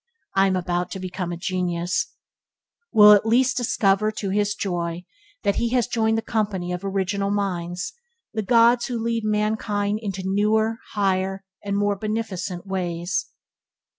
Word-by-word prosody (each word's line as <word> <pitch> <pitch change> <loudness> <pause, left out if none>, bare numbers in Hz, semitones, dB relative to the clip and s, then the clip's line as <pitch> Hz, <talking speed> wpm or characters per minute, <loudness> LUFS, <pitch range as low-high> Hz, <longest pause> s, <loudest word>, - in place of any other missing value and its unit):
"I 195 0 +4
am 190 - +1
about 180 0 -1
to 190 - -5
become 185 -1 -4
a 170 - -4
genius" 175 -1 -1 0.8
will 210 -2 +9
at 205 - +5
least 250 +4 +3
discover, 215 -3 +2
to 200 -3 -3
his 205 +1 +1
joy, 175 -2 -3 0.4
that 200 - +1
he 235 - +1
has 245 -3 +3
joined 225 -1 +1
the 225 - -2
company 205 -5 -1
of 180 +1 -4
original 195 0 -1
minds, 180 -3 -2 0.4
the 220 - -1
gods 235 +2 +4
who 245 -2 -2
lead 230 0 -1
mankind 210 -1 0
into 195 -3 -4
newer, 215 +3 +1
higher, 195 -1 0 0.2
and 200 0 -1
more 205 0 +1
beneficent 200 -4 -3
ways. 180 - -2
200 Hz, 150 wpm, -23 LUFS, 185-215 Hz, 0.8 s, will